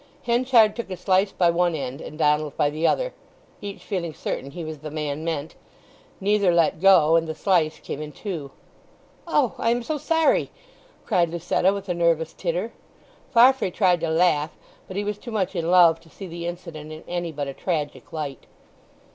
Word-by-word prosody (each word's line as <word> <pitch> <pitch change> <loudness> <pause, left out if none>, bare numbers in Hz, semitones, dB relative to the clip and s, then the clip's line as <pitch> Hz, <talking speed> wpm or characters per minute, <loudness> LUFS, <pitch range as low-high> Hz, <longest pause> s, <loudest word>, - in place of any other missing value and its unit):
Henchard 235 -2 +4
took 235 -4 -5
a 185 - -5
slice 190 +2 +2
by 175 -2 +3
one 175 0 +1
end 135 -1 -5
and 150 - -9
Donald 150 -2 +1
by 145 - +2
the 155 +2 0
other; - - 0 0.5
each 200 -1 -7
feeling 170 -6 -3
certain 135 - -4
he 170 +4 -7
was 155 -1 -6
the 155 +1 -7
man 150 0 -4
meant; 160 -2 -3 0.7
neither 200 -1 +2
let 170 -1 +2
go, 180 -5 +6
and 165 0 +2
the 160 - -4
slice 160 -5 +1
came 145 - -6
in 150 0 -6
two. 165 -7 -6 0.8
"Oh—I 270 -7 +1
am 240 +1 +1
so 305 +3 -3
sorry!" 325 +2 +2 0.6
cried 170 -2 +2
Lucetta, 170 +2 +1
with 200 0 -5
a 180 - 0
nervous 165 -2 +1
titter. - - -3 0.6
Farfrae 260 -2 +5
tried 180 -2 +2
to 165 0 -2
laugh; 160 -2 +2 0.4
but 190 - -7
he 205 - 0
was 205 0 -3
too 240 - -9
much 200 -4 -1
in 170 -1 -1
love 175 -2 +6
to 165 0 -20
see 195 - -10
the 170 -1 -6
incident 170 -3 -7
in 155 0 -9
any 175 -1 -3
but 145 -2 -4
a 135 - -5
tragic 145 -5 -3
light. 150 -5 -6
170 Hz, 190 wpm, -24 LUFS, 155-200 Hz, 0.8 s, go